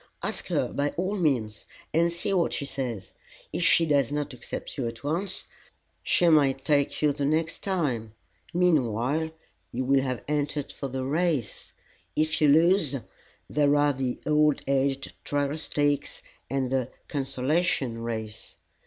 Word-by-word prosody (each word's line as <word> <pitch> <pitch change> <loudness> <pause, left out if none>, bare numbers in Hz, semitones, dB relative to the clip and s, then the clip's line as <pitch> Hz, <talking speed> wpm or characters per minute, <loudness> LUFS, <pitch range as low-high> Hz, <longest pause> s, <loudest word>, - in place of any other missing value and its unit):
Ask - - -2
her, - - 0
by 145 +1 +1
all 190 +4 0
means, 125 - 0 0.3
and 170 +2 +3
see 175 +4 -1
what 175 -3 +2
she 140 - -2
says. 120 -9 -5 0.4
If - - -2
she 170 - +5
does 140 -5 +2
not 145 -2 -2
accept 125 - -7
you 130 -5 -2
at 115 +1 -7
once, 175 +6 -1 0.6
she 175 - +3
may 150 -5 +5
take 140 +2 0
you 150 -1 +4
the 145 - -3
next 160 +3 0
time. 130 - -1 0.4
Meanwhile, 155 -3 +1 0.4
you 130 +2 -2
will 135 +1 +4
have 130 -5 -3
entered 145 -1 -1
for 140 - -5
the 130 0 -3
race. 150 -4 -1 0.4
If 155 +1 +1
you 150 - +6
lose, 160 0 +4 0.5
there 145 -1 +3
are 145 0 +3
the 130 -2 -2
'All 150 -1 +4
aged 135 0 0
Trial 145 0 0
Stakes,' 145 -2 -1 0.3
and 130 -1 -1
the 130 -2 0 0.2
'Consolation 135 -2 0
Race.'" 110 -2 -5
145 Hz, 150 wpm, -27 LUFS, 130-155 Hz, 0.6 s, you